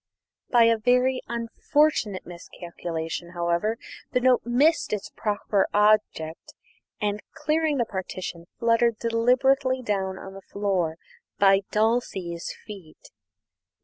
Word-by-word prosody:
By 240 Hz, -2 st, +6 dB
a 230 Hz, -1 st, +4 dB
very 250 Hz, +3 st, +2 dB
unfortunate 235 Hz, -1 st, 0 dB
miscalculation, 170 Hz, -1 st, -6 dB
however, 170 Hz, +6 st, 0 dB, 0.4 s
the -, -, +3 dB
note 250 Hz, 0 st, +4 dB
missed 280 Hz, +3 st, +2 dB
its 210 Hz, -, -4 dB
proper 205 Hz, -2 st, 0 dB
object, 210 Hz, -6 st, +1 dB, 0.4 s
and, 210 Hz, -1 st, -1 dB
clearing 310 Hz, -1 st, 0 dB
the 240 Hz, -, +1 dB
partition, 185 Hz, -4 st, -6 dB
fluttered 230 Hz, -1 st, +2 dB
deliberately 255 Hz, +3 st, +2 dB
down 190 Hz, -4 st, -1 dB
on 190 Hz, -, -9 dB
the 195 Hz, -, -10 dB
floor 190 Hz, -6 st, -1 dB, 0.4 s
by 195 Hz, -1 st, +5 dB
Dulcie's 210 Hz, -6 st, -1 dB
feet. 195 Hz, -8 st, -12 dB
215 Hz, 110 wpm, -25 LUFS, 185-245 Hz, 0.4 s, By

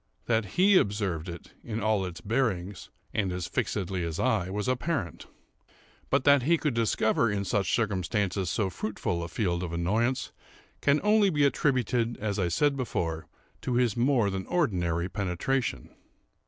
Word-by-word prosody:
That 110 Hz, -2 st, +1 dB
he 190 Hz, +1 st, +6 dB
observed 100 Hz, -, 0 dB
it 85 Hz, -1 st, -9 dB
in 110 Hz, -1 st, -4 dB
all 110 Hz, -2 st, +1 dB
its 85 Hz, -1 st, -8 dB
bearings, 100 Hz, -6 st, -1 dB, 0.2 s
and 100 Hz, -4 st, 0 dB
as 90 Hz, -1 st, -3 dB
fixedly 95 Hz, -1 st, -2 dB
as 85 Hz, -1 st, -3 dB
I, 110 Hz, -8 st, +1 dB
was 105 Hz, +3 st, -3 dB
apparent; 130 Hz, -, -2 dB, 0.8 s
but 140 Hz, -1 st, +2 dB
that 140 Hz, -1 st, +6 dB
he 165 Hz, +7 st, +3 dB
could 150 Hz, -4 st, -1 dB
discover 115 Hz, 0 st, +2 dB
in 100 Hz, -1 st, -1 dB
such 100 Hz, 0 st, 0 dB
circumstances 100 Hz, -3 st, -1 dB
so 100 Hz, -5 st, 0 dB
fruitful 95 Hz, -5 st, -3 dB
a 85 Hz, -, -4 dB
field 85 Hz, -1 st, -1 dB
of 90 Hz, -2 st, -4 dB
annoyance, 110 Hz, +10 st, 0 dB, 0.5 s
can 145 Hz, +1 st, +3 dB
only 210 Hz, -1 st, +4 dB
be 145 Hz, -5 st, +2 dB
attributed, 125 Hz, -4 st, +1 dB
as 105 Hz, -1 st, -2 dB
I 90 Hz, -, +1 dB
said 145 Hz, -, +2 dB
before, 85 Hz, -11 st, -3 dB, 0.3 s
to 125 Hz, -, -2 dB
his 120 Hz, -4 st, +2 dB
more 120 Hz, -4 st, +2 dB
than 95 Hz, -1 st, -4 dB
ordinary 90 Hz, -, 0 dB
penetration. 95 Hz, -, -2 dB
105 Hz, 155 wpm, -28 LUFS, 90-130 Hz, 0.8 s, he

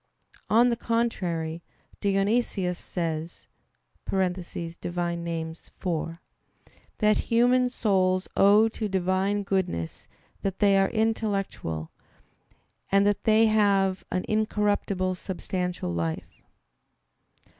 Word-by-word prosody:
On 235 Hz, +3 st, +5 dB
the -, -, +1 dB
contrary, 180 Hz, -9 st, -1 dB, 0.4 s
Dionysius 195 Hz, -2 st, +1 dB
says 165 Hz, -1 st, -4 dB, 0.6 s
(Div. 175 Hz, -2 st, -3 dB
Nom. 170 Hz, -1 st, -2 dB
iv) 165 Hz, 0 st, -4 dB, 0.8 s
that 215 Hz, -1 st, +3 dB
human 245 Hz, +2 st, +3 dB
souls 185 Hz, -6 st, +1 dB
owe 205 Hz, +3 st, +6 dB
to 215 Hz, -1 st, -4 dB
Divine 190 Hz, +2 st, 0 dB
goodness 180 Hz, -, -2 dB, 0.3 s
that 195 Hz, -1 st, -2 dB
they 200 Hz, -2 st, +4 dB
are 195 Hz, -, +3 dB
"intellectual," 205 Hz, -, -1 dB, 1.0 s
and 200 Hz, 0 st, +4 dB
that 205 Hz, -1 st, +1 dB
they 220 Hz, +1 st, +5 dB
have 200 Hz, -3 st, +2 dB
"an 185 Hz, -, -2 dB
incorruptible 205 Hz, -3 st, 0 dB
substantial 180 Hz, -, -3 dB
life." 85 Hz, -1 st, -4 dB
195 Hz, 90 wpm, -26 LUFS, 175-210 Hz, 1.0 s, owe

